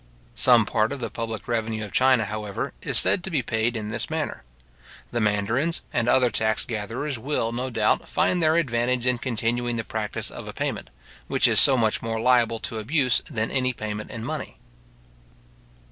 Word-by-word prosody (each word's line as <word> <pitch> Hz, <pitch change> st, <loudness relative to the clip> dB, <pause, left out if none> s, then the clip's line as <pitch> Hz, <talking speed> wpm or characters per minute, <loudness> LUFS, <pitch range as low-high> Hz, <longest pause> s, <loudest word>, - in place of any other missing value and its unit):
Some 120 Hz, -4 st, +5 dB
part 110 Hz, +1 st, +1 dB
of 140 Hz, -, -4 dB
the 115 Hz, -3 st, -4 dB
public 115 Hz, -2 st, -5 dB
revenue 110 Hz, -2 st, -2 dB
of 100 Hz, -, -11 dB
China, 130 Hz, -2 st, +3 dB
however, 105 Hz, -1 st, -4 dB
is -, -, +1 dB
said 180 Hz, -, +4 dB
to 190 Hz, -, -4 dB
be 150 Hz, -8 st, 0 dB
paid 115 Hz, +1 st, -1 dB
in 105 Hz, -1 st, -5 dB
this 110 Hz, -, -3 dB
manner. -, -, -3 dB, 0.7 s
The 120 Hz, -, -1 dB
mandarins 110 Hz, +10 st, 0 dB
and 120 Hz, -1 st, +1 dB
other 125 Hz, -1 st, +4 dB
tax 110 Hz, -1 st, +1 dB
gatherers 115 Hz, +5 st, -4 dB
will, 120 Hz, -3 st, -1 dB
no 125 Hz, +2 st, -3 dB
doubt, 120 Hz, -, 0 dB
find 180 Hz, -, +1 dB
their 155 Hz, 0 st, +3 dB
advantage 125 Hz, -5 st, 0 dB
in 125 Hz, -1 st, +2 dB
continuing 120 Hz, 0 st, -1 dB
the 115 Hz, -, -2 dB
practice 110 Hz, -1 st, -3 dB
of -, -, -9 dB
a -, -, -7 dB
payment, -, -, -4 dB, 0.4 s
which -, -, +3 dB
is -, -, +6 dB
so 135 Hz, -2 st, +7 dB
much 110 Hz, -3 st, +1 dB
more 115 Hz, 0 st, -3 dB
liable 115 Hz, -1 st, +3 dB
to 115 Hz, -5 st, -4 dB
abuse 130 Hz, +3 st, +1 dB
than 110 Hz, -1 st, -2 dB
any 130 Hz, -1 st, 0 dB
payment 110 Hz, -2 st, -5 dB
in 115 Hz, -2 st, -6 dB
money. -, -, -5 dB
115 Hz, 185 wpm, -24 LUFS, 110-125 Hz, 0.7 s, so